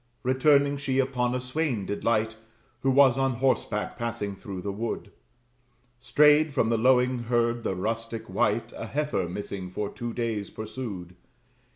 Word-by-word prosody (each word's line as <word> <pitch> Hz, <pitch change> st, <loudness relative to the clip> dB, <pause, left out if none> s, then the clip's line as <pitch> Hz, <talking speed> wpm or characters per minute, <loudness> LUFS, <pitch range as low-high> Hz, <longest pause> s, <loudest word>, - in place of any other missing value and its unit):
Returning, 140 Hz, +2 st, +3 dB
she 135 Hz, -2 st, -1 dB
upon 125 Hz, -2 st, +1 dB
a -, -, 0 dB
swain 125 Hz, -4 st, -2 dB
did 100 Hz, -, -4 dB
light, 110 Hz, -1 st, +1 dB, 0.4 s
Who 135 Hz, -, +1 dB
was 135 Hz, -1 st, +5 dB
on 135 Hz, -1 st, +2 dB
horseback 120 Hz, -4 st, 0 dB
passing 115 Hz, -4 st, -3 dB
through 95 Hz, -2 st, -7 dB
the 100 Hz, -, -2 dB
wood. 110 Hz, +4 st, -4 dB, 0.9 s
Strayed 150 Hz, +5 st, +5 dB
from 115 Hz, -4 st, +1 dB
the 115 Hz, -, +2 dB
lowing 125 Hz, +1 st, +3 dB
herd, 120 Hz, 0 st, +1 dB
the 95 Hz, -, -2 dB
rustic 115 Hz, +3 st, -3 dB
wight 115 Hz, 0 st, 0 dB
A 115 Hz, -, -6 dB
heifer 145 Hz, -, -1 dB
missing 95 Hz, 0 st, -5 dB
for 100 Hz, +2 st, -3 dB
two 120 Hz, 0 st, -4 dB
days 115 Hz, -4 st, -2 dB
pursued. 110 Hz, -6 st, -6 dB
120 Hz, 155 wpm, -27 LUFS, 110-130 Hz, 0.9 s, was